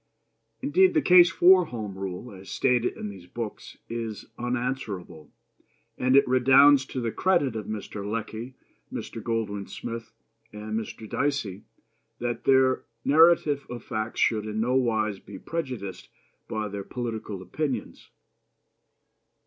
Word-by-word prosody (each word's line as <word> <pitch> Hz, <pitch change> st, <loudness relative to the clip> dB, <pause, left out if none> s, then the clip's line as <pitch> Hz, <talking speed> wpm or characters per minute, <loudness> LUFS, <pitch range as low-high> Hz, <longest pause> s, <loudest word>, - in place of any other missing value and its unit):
Indeed, 365 Hz, +6 st, +4 dB
the 310 Hz, -, +4 dB
case 180 Hz, -1 st, +8 dB
for 185 Hz, 0 st, +6 dB
Home 110 Hz, -9 st, -6 dB
Rule, 95 Hz, +4 st, -6 dB
as 95 Hz, -1 st, -12 dB
stated 125 Hz, -2 st, +1 dB
in 105 Hz, -, -5 dB
these 95 Hz, -3 st, -11 dB
books, 115 Hz, +2 st, -7 dB
is 115 Hz, -2 st, -5 dB
unanswerable; 120 Hz, -, -4 dB, 0.7 s
and 130 Hz, +1 st, +2 dB
it 140 Hz, -, +6 dB
redounds 135 Hz, +2 st, +6 dB
to 130 Hz, -, -4 dB
the 115 Hz, -2 st, -2 dB
credit 170 Hz, -9 st, +1 dB
of 110 Hz, -2 st, -5 dB
Mr. 105 Hz, -1 st, -5 dB
Lecky, 115 Hz, +4 st, -5 dB, 0.4 s
Mr. 115 Hz, -, -6 dB
Goldwin 105 Hz, -3 st, -2 dB
Smith, 115 Hz, -1 st, -6 dB, 0.4 s
and 105 Hz, +1 st, -7 dB
Mr. 110 Hz, 0 st, -5 dB
Dicey 130 Hz, -8 st, -2 dB, 0.5 s
that 120 Hz, 0 st, -3 dB
their 130 Hz, -1 st, +4 dB, 0.2 s
narrative 155 Hz, -1 st, +4 dB
of 120 Hz, -1 st, -7 dB
facts 110 Hz, +1 st, -4 dB
should 110 Hz, -2 st, +2 dB
in 105 Hz, 0 st, -3 dB
no 120 Hz, +3 st, +1 dB
wise 110 Hz, -6 st, +1 dB
be -, -, -11 dB
prejudiced 125 Hz, -, -5 dB, 0.4 s
by 110 Hz, -1 st, -3 dB
their 100 Hz, -1 st, -5 dB
political 110 Hz, -4 st, -5 dB
opinions. 130 Hz, 0 st, -4 dB
115 Hz, 135 wpm, -26 LUFS, 105-135 Hz, 0.7 s, case